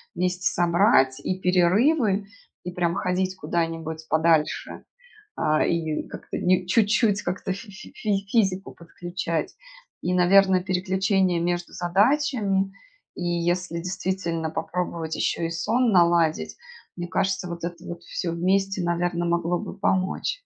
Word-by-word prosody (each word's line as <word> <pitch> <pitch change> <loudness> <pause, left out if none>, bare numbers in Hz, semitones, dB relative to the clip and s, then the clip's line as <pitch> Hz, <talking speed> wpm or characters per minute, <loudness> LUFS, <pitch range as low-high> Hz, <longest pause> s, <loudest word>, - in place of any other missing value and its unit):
вместе 180 +1 0
собрать- 170 - +3
и 185 0 -2
перерывы, 195 - +2 0.4
и, 180 - -4
прям, 175 0 0
ходить 185 0 -1
куда-нибудь 160 -1 -3
подальше, 160 -1 +1 0.5
а, 155 0 +2
и 160 -2 -1
как-то, - - -7
ни 185 0 +2
чуть-чуть, 210 +1 +2
как-то 185 +1 -2
фи 200 +3 -10
фи 195 - -12
фись 200 -2 -2
физику 195 -4 +1
подключать, 170 -1 -4 0.5
и, 180 - -1
наверно, 185 +1 +5
переключение 190 -1 +1
между 175 +1 -2
задачами, 195 - +1 0.4
и, 175 - -5
если 175 0 -1
действительно, 180 -2 -2
попробовать 165 -1 -3
ещё - - -1
и 165 - -1
сон 225 +9 +1
наладить, 170 -3 +3 0.4
мне 175 0 -4
кажется, 190 +1 -1
вот 170 -1 -7
это 170 0 -5
вот 175 0 -7
всё 170 0 -3
вместе, 190 +2 +1
наверно, 175 0 0
могло 170 0 0
бы - - -7
помочь. 190 -1 0
180 Hz, 130 wpm, -24 LUFS, 170-195 Hz, 0.5 s, наверно